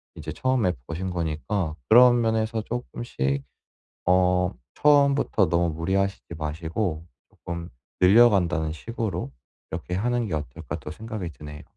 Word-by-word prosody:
이제 80 0 -6
처음에 130 -8 +1
버신 90 +3 -4
거니까 80 +1 -2
그런 120 +1 +7
면에서 110 0 0
쪼끔씩 105 - -3 0.6
어 90 0 +3 0.2
'처음부터 140 -8 +4
너무 85 0 +2
무리하시지 95 +4 -1
마시고 80 +2 -3 0.2
조금 85 0 -7 0.3
늘려간다는 90 -6 +5
식으로 95 - -4 0.4
이렇게 85 +2 -5
하는 120 +4 0
게 85 - -4
어떨까.' 75 -5 -5
또 - - -8
생각이 110 -1 -6
드네요. 75 +2 -10
90 Hz, 300 characters per minute, -25 LUFS, 80-110 Hz, 0.6 s, 그런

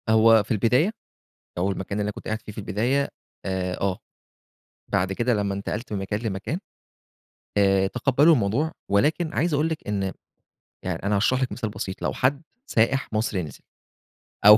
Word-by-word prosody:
هو 110 0 +6
في 105 - -8
البداية 125 - +3 0.7
أو 95 +3 +1
المكان 95 +1 -6
اللي - - +2
أنا 105 - -1
كنت - - -11
قاعد 110 +1 -2
فيه 105 - -8
في - - -12
البداية 115 +8 0 0.4
آآ 90 -1 -2
آه. 95 -2 0 0.9
بعد 95 -1 +2
كده 120 +5 +1
لمّا 100 -2 0
انتقلت 105 +4 -4
من 105 - -1
مكان 100 +2 -2
لمكان 110 - -3 1.0
آآ 95 -1 +4
تقَبلّوا 135 +8 +4
الموضوع، 125 +6 +1 0.2
ولكن 155 - +2
عايز 170 0 +1
أقول 150 +3 +2
لِك 160 -7 -5
إن 100 -2 0 0.8
يع 90 -2 -1
أنا 105 +1 +1
هاشرح 130 +6 +2
لِك 130 - 0
مثال 115 -3 -3
بسيط، 100 -2 -5
لو - - 0
حد 140 +4 +1 0.2
سائح 120 +3 +1
مصري 105 -4 0
نزِل 75 -4 -9 0.8
أو 105 +1 +11
105 Hz, 170 wpm, -25 LUFS, 100-130 Hz, 1.0 s, أو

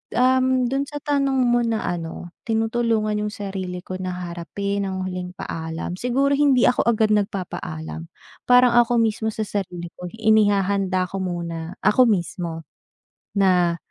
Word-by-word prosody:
Um, 255 0 +3
do'n 275 +1 0
sa 290 -1 -7
tanong 275 -2 +1
mo 240 0 +3
na 225 -1 0
ano 175 0 -4 0.2
tinutulungan 225 -1 +1
yung 210 - -4
sarili 190 -3 -5
ko 185 - -5
na 185 -1 -3
harapin 180 +3 -3
ang 190 0 -3
huling 180 -1 -5
paalam, 165 +2 -5
siguro 270 +3 +1
hindi 275 -4 +4
ako 250 - +1
agad 220 -2 +3
nagpapaalam. 175 -5 -3 0.4
Parang 250 -1 +6
ako 240 0 +4
mismo 220 0 0
sa 220 - -4
sarili 180 -4 -4
ko, 180 - -7
inihahanda 200 -4 +2
ko 195 - -5
muna, 170 -2 -4
ako 250 +4 +5
mismo 170 -4 -2 0.7
na 180 -3 +3
200 Hz, 140 wpm, -22 LUFS, 180-235 Hz, 0.7 s, Parang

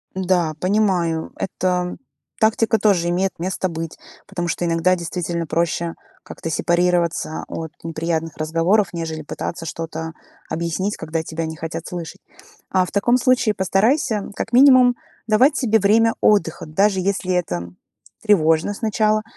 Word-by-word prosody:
Да, 180 -4 +1
понимаю. 185 -5 +1
Эта 180 -1 -1 0.4
тактика 220 0 +3
тоже 190 -6 +2
имеет 185 +2 -1
место 185 +2 -2
быть. 165 -1 -5 0.3
Потому 175 -4 -4
что 175 - -2
иногда, 170 +2 +2
действительно, 170 -1 -3
проще 170 +1 -1 0.3
как-то 165 - -7
сепарироваться 175 -1 0
от 160 -1 -5
неприятных 165 -1 -3
разговоров, 165 +6 +2
нежели 160 -2 -4
пытаться 165 +2 -5
что-то 160 0 -5 0.4
объяснить, 170 +5 -2
когда 160 +1 -3
тебя 160 0 -4
не 160 0 -6
хотят 165 +1 -6
слышать. 175 +2 -7 0.5
А 185 -1 +3
в - - -7
таком 225 +5 +2
случае 250 -3 +2
постарайся 205 - +1
как 225 - -4
минимум 255 -1 +7 0.3
давать 250 +7 +4
себе 225 -4 +2
время 225 +3 +3
отдыха, 170 -7 +2
даже 195 +5 +2
если 185 -1 -1
это 85 - -2 0.5
тревожно 170 -2 +3
сначала. 215 0 +1
180 Hz, 135 wpm, -21 LUFS, 165-205 Hz, 0.5 s, минимум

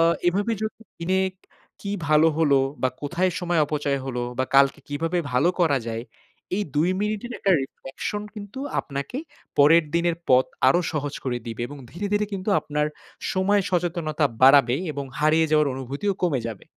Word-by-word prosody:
আ - - +5 0.3
এভাবে 200 +6 0
যদি 215 +1 -4 0.2
দিনে 185 +3 +1 0.6
কী 200 - -3 0.2
ভালো 155 +1 +5
হলো? 145 -4 +4 0.2
বা 130 - +4
কোথায় 175 +6 0
সময় 175 -2 +1
অপচয় 145 -2 -1
হলো? 125 -2 -3 0.2
বা 130 - +2
কালকে 140 +2 +5
কীভাবে 165 +5 -1
ভালো 130 +8 +3
করা 145 -5 +3
যায়? 115 0 -3 0.5
এই 210 - 0
২ 160 +5 +3
মিনিটের 215 +3 -2
একটা 195 - +1
রিফ্লেকশন 135 +10 -5
কিন্তু 205 +3 -8 0.2
আপনাকে 140 - -5 0.4
পরের 160 +3 +6
দিনের 170 0 +2
পথ 130 0 +6 0.2
আরও 175 +7 +4
সহজ 145 -2 -3
করে 125 -2 -1
দিবে 115 0 -4
এবং 145 - -9
ধীরে, 195 +5 -4
ধীরে 210 0 +2
কিন্তু 195 +1 -4
আপনার 150 0 -1 0.5
সময় 200 +2 +2
সচেতনতা 170 -4 0 0.2
বাড়াবে 135 -2 +7 0.2
এবং 140 -1 -4
হারিয়ে 155 +2 +3
যাওয়ার 150 -2 +3
অনুভূতিও 140 +10 -2
কমে 150 -8 +1
যাবে। 110 -4 -7
155 Hz, 165 wpm, -24 LUFS, 140-185 Hz, 0.6 s, বাড়াবে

